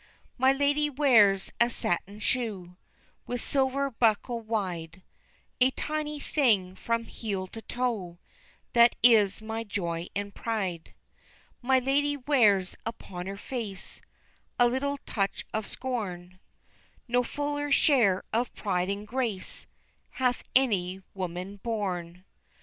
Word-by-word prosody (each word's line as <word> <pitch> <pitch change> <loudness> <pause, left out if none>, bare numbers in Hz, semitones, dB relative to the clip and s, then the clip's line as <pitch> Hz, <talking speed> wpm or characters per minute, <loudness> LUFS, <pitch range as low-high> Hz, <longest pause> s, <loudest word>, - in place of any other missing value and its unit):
My 260 +1 +4
ladye 285 +2 +2
wears 230 -9 +4
a 235 - +5
satin 200 -2 -2
shoe, 210 -6 -2 0.5
With 245 0 -2
silver 275 +1 +1
buckle 230 +1 +1
wide, 185 -6 -3 0.6
A 255 +1 +6
tiny 300 +2 -3
thing 210 -12 +2
from 230 +3 -1
heel 200 -5 -4
to 225 +4 -9
toe 220 -9 -2 0.6
That 235 0 +6
is 220 -4 +5
my 225 +1 -3
joy 170 -5 -3
and 200 0 -3
pride. 195 -9 -3 0.7
My 260 +2 +3
ladye 285 +3 +1
wears 220 -9 +3
upon 190 -5 -6
her 195 +1 -5
face 210 -4 -5 0.6
A 245 - +6
little 280 +3 -1
touch 200 -2 -1
of 220 -1 -2
scorn, 185 -8 -4 0.7
No 245 +1 +3
fuller 290 +3 -3
share 240 -10 +4
of 235 +2 +1
pride 185 -2 -1
and 200 +1 -3
grace 230 -5 -3 0.5
Hath 250 -1 +1
any 190 -8 +2
woman 185 +1 -5
born. 185 -5 -3
225 Hz, 120 wpm, -28 LUFS, 190-255 Hz, 0.7 s, A